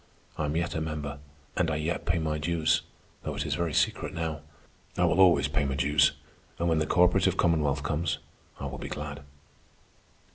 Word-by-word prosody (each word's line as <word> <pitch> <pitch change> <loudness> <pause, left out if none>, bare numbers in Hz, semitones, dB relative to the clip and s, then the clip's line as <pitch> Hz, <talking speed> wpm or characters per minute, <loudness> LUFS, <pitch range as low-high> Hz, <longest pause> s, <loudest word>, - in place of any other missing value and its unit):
I 80 - -1
am 75 +1 -2
yet 85 +1 0
a 80 - -2
member, 75 -2 -4 0.4
and 90 -3 +1
I 80 - 0
yet 75 +3 -2
pay 85 0 +2
my 80 -1 -1
dues, 80 0 +1 0.4
though - - -4
it - - -2
is - - -1
very 85 -2 -1
secret - - +1
now. 80 -2 -3 0.6
I - - +3
will 90 - +2
always 90 -2 +6
pay 75 - 0
my 70 -1 -1
dues, 75 +2 +3 0.4
and 85 - 0
when 80 -2 +2
the 75 - 0
cooperative 90 +2 +3
commonwealth 75 -4 +2
comes, 80 +3 -1 0.4
I - - -4
will - - -5
be - - -6
glad." 75 -1 -5
80 Hz, 190 wpm, -28 LUFS, 75-85 Hz, 0.6 s, always